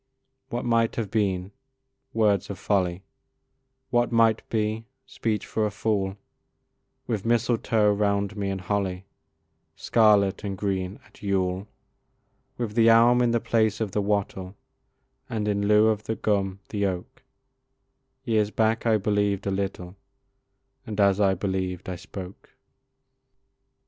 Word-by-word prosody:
What 120 Hz, +1 st, -3 dB
might 115 Hz, -1 st, +2 dB
have 110 Hz, -4 st, -3 dB
been! 95 Hz, -4 st, 0 dB, 0.6 s
words 105 Hz, -4 st, +2 dB
of 100 Hz, -, -5 dB
folly; 95 Hz, -2 st, 0 dB, 0.9 s
What 120 Hz, 0 st, +2 dB
might 115 Hz, -1 st, +4 dB
be! 110 Hz, 0 st, -1 dB, 0.2 s
speech 110 Hz, -2 st, -2 dB
for 110 Hz, -, -1 dB
a 105 Hz, -, +1 dB
fool; 100 Hz, -2 st, -1 dB, 0.9 s
With 110 Hz, -4 st, -2 dB
mistletoe 115 Hz, -2 st, +2 dB
round 100 Hz, 0 st, 0 dB
me, 100 Hz, -2 st, -2 dB
and 95 Hz, -1 st, -3 dB
holly, 95 Hz, -1 st, -2 dB, 0.7 s
Scarlet 105 Hz, -3 st, +3 dB
and 100 Hz, -2 st, -4 dB
green, 95 Hz, -1 st, -2 dB
at 105 Hz, -, -21 dB
Yule. 95 Hz, -1 st, -1 dB, 0.9 s
With 115 Hz, -4 st, -3 dB
the 115 Hz, 0 st, +5 dB
elm 120 Hz, +2 st, +6 dB
in 120 Hz, -, +3 dB
the 120 Hz, 0 st, +2 dB
place 110 Hz, -2 st, +1 dB
of 110 Hz, -3 st, -2 dB
the 105 Hz, -, 0 dB
wattle, 100 Hz, -2 st, -2 dB, 0.7 s
And 105 Hz, -2 st, -2 dB
in 100 Hz, -1 st, 0 dB
lieu 105 Hz, +1 st, +5 dB
of 110 Hz, -1 st, -1 dB
the 110 Hz, -, -2 dB
gum, 100 Hz, -2 st, -1 dB
the 100 Hz, -2 st, 0 dB
oak, 90 Hz, -2 st, -6 dB, 1.0 s
Years 110 Hz, -3 st, +1 dB
back 110 Hz, +2 st, +1 dB
I 110 Hz, -1 st, +4 dB
believed 100 Hz, -1 st, 0 dB
a 100 Hz, -, 0 dB
little, 95 Hz, -2 st, -4 dB, 0.9 s
And 105 Hz, -1 st, -6 dB
as 100 Hz, -1 st, +4 dB
I 95 Hz, -1 st, +3 dB
believed 95 Hz, -1 st, -3 dB
I 90 Hz, -, -3 dB
spoke. 90 Hz, +2 st, -10 dB
105 Hz, 135 wpm, -25 LUFS, 95-110 Hz, 1.0 s, elm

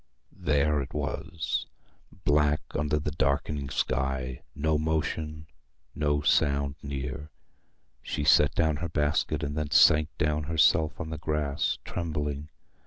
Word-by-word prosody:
There 75 Hz, 0 st, +1 dB
it 70 Hz, +2 st, -8 dB
was, 75 Hz, +1 st, -3 dB, 0.6 s
black 75 Hz, 0 st, +3 dB
under 75 Hz, +1 st, 0 dB
the 75 Hz, 0 st, -2 dB
darkening 70 Hz, -1 st, -1 dB
sky: 65 Hz, -1 st, -1 dB
no 75 Hz, +1 st, +1 dB
motion, 80 Hz, 0 st, -2 dB, 0.5 s
no 75 Hz, -1 st, 0 dB
sound 70 Hz, -1 st, +2 dB
near. 70 Hz, +1 st, -5 dB, 0.7 s
She 75 Hz, -, -3 dB
set 75 Hz, -2 st, +5 dB
down 80 Hz, -2 st, +2 dB
her 85 Hz, +1 st, -4 dB
basket, 75 Hz, 0 st, 0 dB
and 70 Hz, 0 st, -3 dB
then 75 Hz, -1 st, -2 dB
sank 75 Hz, +1 st, +6 dB
down 75 Hz, 0 st, 0 dB
herself 80 Hz, 0 st, +3 dB
on 80 Hz, -, -5 dB
the 80 Hz, -, -5 dB
grass, 75 Hz, -3 st, -1 dB
trembling. 75 Hz, -3 st, -3 dB
75 Hz, 125 wpm, -28 LUFS, 70-75 Hz, 0.7 s, sank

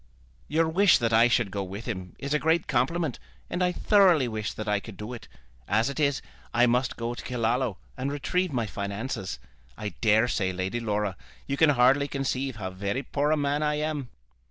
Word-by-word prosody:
"Your 160 Hz, +2 st, +2 dB
wish 180 Hz, +2 st, +5 dB
that 115 Hz, -2 st, 0 dB
I 115 Hz, +2 st, +6 dB
should 120 Hz, -4 st, +1 dB
go 100 Hz, -, -2 dB
with 100 Hz, +3 st, -6 dB
him 95 Hz, -7 st, -5 dB
is 140 Hz, +1 st, -3 dB
a 150 Hz, -, +3 dB
great 160 Hz, +2 st, +2 dB
compliment, 155 Hz, +2 st, 0 dB, 0.3 s
and 180 Hz, -, 0 dB
I 180 Hz, -, +2 dB
thoroughly 180 Hz, -, +4 dB
wish 110 Hz, -2 st, -3 dB
that 110 Hz, -, -6 dB
I 105 Hz, -1 st, +2 dB
could 100 Hz, -1 st, -11 dB
do 105 Hz, +5 st, -6 dB
it. 115 Hz, -4 st, -9 dB, 0.4 s
As 115 Hz, +5 st, +2 dB
it 140 Hz, -, -6 dB
is, 140 Hz, -2 st, +1 dB, 0.3 s
I 120 Hz, +1 st, +6 dB
must 125 Hz, +1 st, +1 dB
go 115 Hz, 0 st, -2 dB
to -, -, -8 dB
Killaloe 120 Hz, -2 st, 0 dB, 0.2 s
and 135 Hz, +2 st, -2 dB
retrieve 180 Hz, +5 st, -1 dB
my 120 Hz, -4 st, 0 dB
finances. 100 Hz, -, -4 dB, 0.4 s
I 105 Hz, -, -3 dB
daresay, 110 Hz, -3 st, +2 dB
Lady 95 Hz, +5 st, -2 dB
Laura, 105 Hz, -3 st, -1 dB, 0.3 s
you 140 Hz, -, -2 dB
can 160 Hz, +2 st, +5 dB
hardly 135 Hz, +1 st, +4 dB
conceive 135 Hz, -2 st, -2 dB
how 95 Hz, -4 st, -5 dB
very 100 Hz, +8 st, -3 dB
poor 145 Hz, +2 st, 0 dB
a 155 Hz, -, +3 dB
man 145 Hz, 0 st, 0 dB
I 150 Hz, 0 st, +1 dB
am." 150 Hz, -4 st, -2 dB
125 Hz, 200 wpm, -27 LUFS, 105-145 Hz, 0.4 s, I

